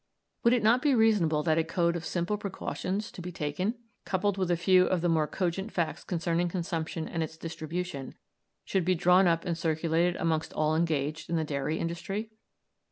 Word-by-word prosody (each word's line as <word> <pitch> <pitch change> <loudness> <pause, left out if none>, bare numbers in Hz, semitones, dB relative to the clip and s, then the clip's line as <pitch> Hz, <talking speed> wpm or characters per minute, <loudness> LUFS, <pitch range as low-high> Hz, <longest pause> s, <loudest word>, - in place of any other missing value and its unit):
Would 235 - +5
it 240 -3 +2
not 235 +4 +5
be 285 -2 +3
reasonable 195 -10 +3
that 160 0 +2
a - - +3
code 170 +1 +1
of 170 -1 -4
simple 175 +5 -1
precautions 200 0 -4
to - - -9
be 180 +1 -6
taken, 165 +8 -2 0.3
coupled 195 +1 0
with 190 -2 -1
a 175 - +2
few 185 +2 +4
of 185 -2 +1
the 175 - +1
more 160 -2 +2
cogent 190 +6 -2
facts 170 -3 -2
concerning 175 0 0
consumption 165 -2 -3
and 165 - -3
its 160 0 -4
distribution, 165 -2 -5 0.5
should 190 - 0
be 185 +2 +2
drawn 180 +2 +5
up 165 0 +1
and 175 -2 0
circulated 165 +2 +1
amongst 160 -1 -1
all 155 0 +1
engaged 160 -2 -1
in 170 - 0
the 160 - +1
dairy 150 +1 -2
industry? 195 +6 -3
170 Hz, 190 wpm, -29 LUFS, 160-185 Hz, 0.5 s, Would